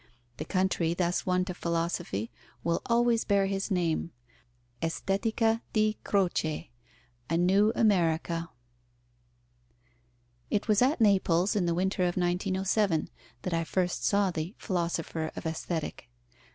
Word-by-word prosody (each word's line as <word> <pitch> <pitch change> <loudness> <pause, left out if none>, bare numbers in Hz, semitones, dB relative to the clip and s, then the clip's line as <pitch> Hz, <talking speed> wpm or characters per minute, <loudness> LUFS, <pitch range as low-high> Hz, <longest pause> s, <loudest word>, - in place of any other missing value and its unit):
The - - -4
country 185 -3 +1
thus 175 0 0
won 180 0 +2
to 185 - -4
philosophy 170 - -2 0.3
will 170 0 0
always 235 -1 +3
bear 200 -1 +2
his 195 +1 -2
name, 170 -3 0 0.7
Estetica 220 +7 0
di 215 -1 +2
Croce, 175 - 0 0.6
a 165 - +1
new 195 +5 +4
America. 170 -5 +1 2.0
It 210 +2 0
was 215 0 +3
at 260 +1 +3
Naples, 190 -3 +3
in 185 -4 +1
the 170 - +1
winter 190 +2 0
of 175 - -3
1907, 185 0 +1 0.3
that 185 - -2
I 165 0 +1
first 180 +2 -1
saw 200 -2 +2
the 165 +4 -4
Philosopher 170 -4 -2
of - - -7
Aesthetic. 160 -5 -4
180 Hz, 125 wpm, -29 LUFS, 170-200 Hz, 2.0 s, new